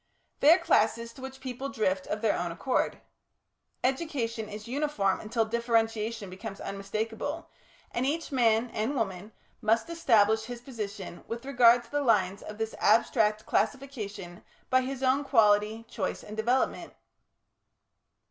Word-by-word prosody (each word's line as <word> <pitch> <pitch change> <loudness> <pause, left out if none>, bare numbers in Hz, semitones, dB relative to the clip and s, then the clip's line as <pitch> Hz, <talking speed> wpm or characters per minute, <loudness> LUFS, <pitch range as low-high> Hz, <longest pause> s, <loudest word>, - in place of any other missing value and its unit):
They 295 - +7
are 340 - +8
classes 230 -8 +1
to 265 - -13
which 265 0 -8
people 260 +1 -5
drift 190 -7 -1
of 210 - -3
their 220 - +3
own 175 -1 -2
accord. 250 +10 -1 0.8
Education 250 -5 -1
is 210 +1 -8
uniform 255 -8 0
until 225 +1 0
differentiation 225 -1 0
becomes 195 +2 -8
unmistakable, 220 +10 -4 0.4
and 240 - -1
each 300 +5 -1
man 235 -2 +2
(and 225 +7 -1
woman) 205 -3 -3 0.3
must 225 +8 +1
establish 220 -9 +3
his 245 0 -7
position 210 -8 -7
with 235 +2 -5
regard 245 -3 +5
to 235 - -20
the 290 - 0
lines 200 -6 +2
of 210 - -8
this 220 0 -3
abstract 215 -1 +3
classification 210 -10 -3 0.3
by 260 0 +5
his 265 0 -4
own 265 +2 +3
quality, 220 -3 +3
choice, 190 -5 -3
and 210 - -8
development.... 240 +4 0
230 Hz, 140 wpm, -29 LUFS, 210-260 Hz, 0.8 s, are